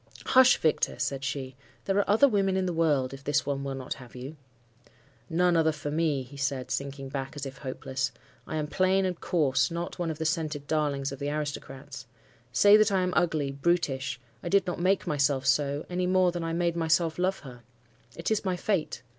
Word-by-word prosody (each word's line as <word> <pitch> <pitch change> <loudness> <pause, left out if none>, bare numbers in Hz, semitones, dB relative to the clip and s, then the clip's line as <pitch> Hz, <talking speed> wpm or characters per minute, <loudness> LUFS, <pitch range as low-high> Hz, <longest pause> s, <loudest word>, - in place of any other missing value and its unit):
"'Hush, 260 -1 +6
Victor!' 155 - +1
said 135 -1 -2
she. 135 -2 -4 0.3
'There 195 0 +1
are 205 - 0
other 220 +8 +6
women 195 -5 +1
in 190 - 0
the 180 - -1
world, 145 -6 +1
if 135 0 -10
this 145 +1 +1
one 140 -1 -2
will 135 -1 -3
not 130 -1 -4
have 125 -2 -14
you.' 130 +5 -7 0.9
"'None 175 +1 +3
other 160 -1 +4
for 145 -1 -5
me,' 150 -3 0
he 135 +3 -13
said, 135 -2 -2
sinking 140 0 -3
back 135 0 -4
as 145 -1 -5
if 135 0 -8
hopeless. 135 0 -3 0.4
'I - - -4
am 155 -1 -1
plain 190 +4 +2
and 180 -2 -2
coarse, 140 -6 +2
not 170 +1 -5
one 175 -2 -1
of 160 - -4
the 160 - -3
scented 155 -2 -1
darlings 145 -3 0
of 135 - -7
the 145 - -2
aristocrats. 145 -2 -5 0.4
Say 205 +9 +7
that 215 -1 +3
I 190 -1 +2
am 180 0 -1
ugly, 155 -5 +1
brutish; 140 -3 0 0.2
I - - -4
did 200 +2 +3
not 180 - -3
make 185 +2 +2
myself 140 -2 +1
so, 140 +1 +1
any 180 0 -1
more 185 -1 +3
than 175 -1 -4
I 165 - -2
made 170 0 0
myself 165 0 +1
love 190 +1 0
her. 125 -4 -11 0.5
It 170 +5 -3
is 220 - +1
my 185 -2 0
fate. 175 -9 -1
155 Hz, 210 wpm, -28 LUFS, 140-175 Hz, 0.9 s, Say